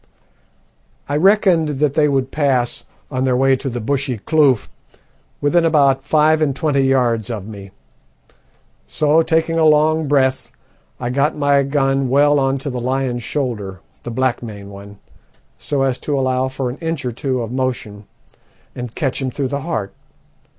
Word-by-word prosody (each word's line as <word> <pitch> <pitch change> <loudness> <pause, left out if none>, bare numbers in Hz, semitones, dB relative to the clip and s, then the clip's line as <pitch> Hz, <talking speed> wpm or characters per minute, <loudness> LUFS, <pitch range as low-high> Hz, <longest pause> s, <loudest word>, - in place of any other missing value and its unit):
"I 145 - -2
reckoned 170 -4 +3
that 145 -1 +1
they 150 0 +3
would 135 -1 0
pass, 135 -5 0 0.3
on 130 -1 -1
their 130 -1 +1
way 135 +1 +3
to 135 - -4
the 120 -1 -4
bushy 135 +1 -2
kloof, 140 -1 +2 0.7
within 165 +4 +3
about 140 -4 +3
five 155 +2 +3
and 140 -4 +1
twenty 145 -2 +1
yards 125 -4 +1
of 105 -5 -5
me, 100 -3 -9 1.2
so, 155 +1 +2
taking 165 0 +1
a - - +3
long 155 0 +3
breath, 135 -2 +1 0.5
I 120 -1 -3
got 140 +4 0
my 145 -1 +3
gun 135 -1 0
well 145 +2 +4
on 135 0 +1
to 140 - -2
the 125 -1 -4
lion's 130 -1 -1
shoulder 115 -8 -4 0.2
the - - -7
black 130 +1 -1
maned 100 -4 -9
one 100 +1 -11 0.6
so 140 -2 -1
as 130 -2 0
to 145 -2 -2
allow 130 0 0
for 130 -1 -3
an 130 - -9
inch 165 -4 -3
or 125 - -1
two 130 +1 -2
of 115 - -6
motion, 120 -5 -3 0.7
and 125 -2 -7
catch 135 -3 -2
him 130 - -1
through 135 +1 -3
the 140 +1 -3
heart. 110 - -4
135 Hz, 165 wpm, -18 LUFS, 125-150 Hz, 1.2 s, well